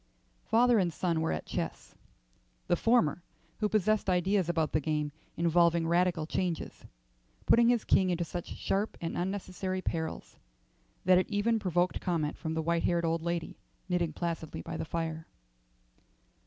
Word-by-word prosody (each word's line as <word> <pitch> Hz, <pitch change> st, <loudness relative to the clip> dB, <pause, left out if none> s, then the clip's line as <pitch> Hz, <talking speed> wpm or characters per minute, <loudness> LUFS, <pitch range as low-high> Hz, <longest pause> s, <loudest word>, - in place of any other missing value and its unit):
Father 235 Hz, 0 st, +4 dB
and 180 Hz, -3 st, +1 dB
son 165 Hz, 0 st, -1 dB
were 160 Hz, -, 0 dB
at -, -, -3 dB
chess, -, -, -5 dB, 0.7 s
the -, -, +2 dB
former, 200 Hz, -6 st, +2 dB, 0.4 s
who 210 Hz, -1 st, +1 dB
possessed 215 Hz, -1 st, +1 dB
ideas 185 Hz, 0 st, +2 dB
about 165 Hz, -3 st, +1 dB
the 155 Hz, -, +2 dB
game 150 Hz, 0 st, -1 dB, 0.3 s
involving 170 Hz, 0 st, +3 dB
radical 170 Hz, -1 st, +2 dB
changes, 170 Hz, +1 st, -3 dB, 0.6 s
putting 235 Hz, 0 st, +5 dB
his 240 Hz, -3 st, +2 dB
king 190 Hz, -1 st, +3 dB
into 175 Hz, -1 st, 0 dB
such 175 Hz, +1 st, -6 dB
sharp 200 Hz, +3 st, -1 dB
and 165 Hz, -, -4 dB
unnecessary 185 Hz, 0 st, -3 dB
perils 165 Hz, -3 st, -4 dB, 0.7 s
that 185 Hz, 0 st, +6 dB
it 185 Hz, -, -1 dB
even 225 Hz, +2 st, +1 dB
provoked 180 Hz, -2 st, 0 dB
comment 165 Hz, -5 st, -1 dB
from 160 Hz, -1 st, -4 dB
the 160 Hz, -, -1 dB
white 170 Hz, +1 st, +1 dB
haired 170 Hz, -1 st, +1 dB
old 165 Hz, 0 st, 0 dB
lady 170 Hz, 0 st, -3 dB, 0.3 s
knitting 175 Hz, -3 st, 0 dB
placidly 165 Hz, -1 st, -4 dB
by 170 Hz, -, -6 dB
the 160 Hz, -, -3 dB
fire. 160 Hz, -1 st, -4 dB
175 Hz, 155 wpm, -30 LUFS, 165-190 Hz, 0.7 s, that